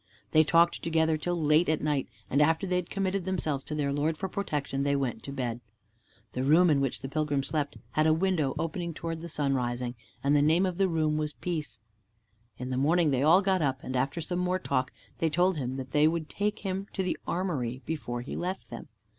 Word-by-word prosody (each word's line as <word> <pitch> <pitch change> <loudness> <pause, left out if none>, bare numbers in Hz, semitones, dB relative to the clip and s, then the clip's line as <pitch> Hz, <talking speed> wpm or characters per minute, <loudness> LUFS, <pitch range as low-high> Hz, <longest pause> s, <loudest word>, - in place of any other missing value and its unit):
They 155 - +6
talked 170 +2 +3
together 160 -1 +2
till 175 +3 -2
late 155 +2 +3
at 155 - +2
night, 145 -3 0 0.2
and 140 - +2
after 160 +5 +3
they 180 -1 0
had 180 -1 -3
committed 195 -1 -1
themselves 160 -7 -1
to 150 - -4
their 140 -2 0
Lord 150 +2 0
for 190 - -2
protection, 150 -8 -2
they 140 0 +2
went 135 -3 -1
to 140 - -7
bed. 120 -3 -3 0.7
The 125 - -3
room 160 +6 +5
in 140 -2 +3
which 135 -2 -1
the 135 - -4
pilgrim 145 -1 0
slept 145 -1 -2
had 155 +1 +2
a - - +5
window 165 -6 +1
opening 165 0 -3
towards 165 -1 -4
the 170 - -7
sunrising, 125 -5 -1 0.3
and 140 +1 +3
the 145 - +5
name 160 +6 +4
of 180 -2 -2
the 195 -1 +3
room 155 -3 +1
was 150 -1 -2
Peace. 155 -11 -4 0.8
In 125 +1 -5
the 130 - -1
morning 160 +3 +3
they 130 -1 +1
all 170 +7 +6
got 190 -2 +2
up, 135 -3 0
and 130 - -4
after 135 +6 0
some 175 +3 -2
more 180 +1 +1
talk, 130 -8 -1 0.3
they 165 - +2
told 175 +3 +2
him 130 -2 -3
that 130 -1 -6
they 150 +2 +5
would 160 -1 -1
take 210 +1 -2
him 195 +1 -2
to 190 - -1
the 185 - 0
armory 135 -9 -2
before 120 -7 -3
he 125 - -6
left 185 -3 -4
them. 115 - -7
155 Hz, 220 wpm, -29 LUFS, 140-175 Hz, 0.8 s, They